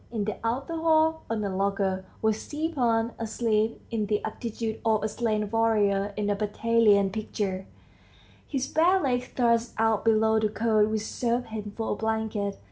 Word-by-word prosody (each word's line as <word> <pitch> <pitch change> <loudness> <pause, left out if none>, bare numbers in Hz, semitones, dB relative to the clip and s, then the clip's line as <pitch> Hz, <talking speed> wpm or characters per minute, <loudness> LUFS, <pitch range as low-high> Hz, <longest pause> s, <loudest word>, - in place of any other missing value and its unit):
In 220 -3 -2
the 215 - -3
outer 270 +8 -2
hall, 320 0 +3
on 225 -2 -1
a 195 -2 -2
locker, 195 -1 0 0.2
was 220 0 +1
Stepan 250 -8 0
asleep 225 -1 0
in 215 -3 -1
the 210 0 0
attitude 225 0 -4
of 220 -2 +2
a - - +1
slain 215 -1 -1
warrior 205 -3 +2
in 210 -1 -1
a 205 - +1
battalion 210 -1 +3
picture, 195 -2 -3 0.8
his 270 -3 -1
bare 350 +5 +3
legs 250 -5 0
thrust 235 -1 +1
out 225 -1 +2
below 220 0 +3
the 215 -1 +1
coat 215 -1 +2
which 215 -1 -1
served 240 +2 -2
him 210 -2 -6
for 225 - -2
a - - 0
blanket. 220 -2 -2
220 Hz, 165 wpm, -27 LUFS, 210-235 Hz, 0.8 s, hall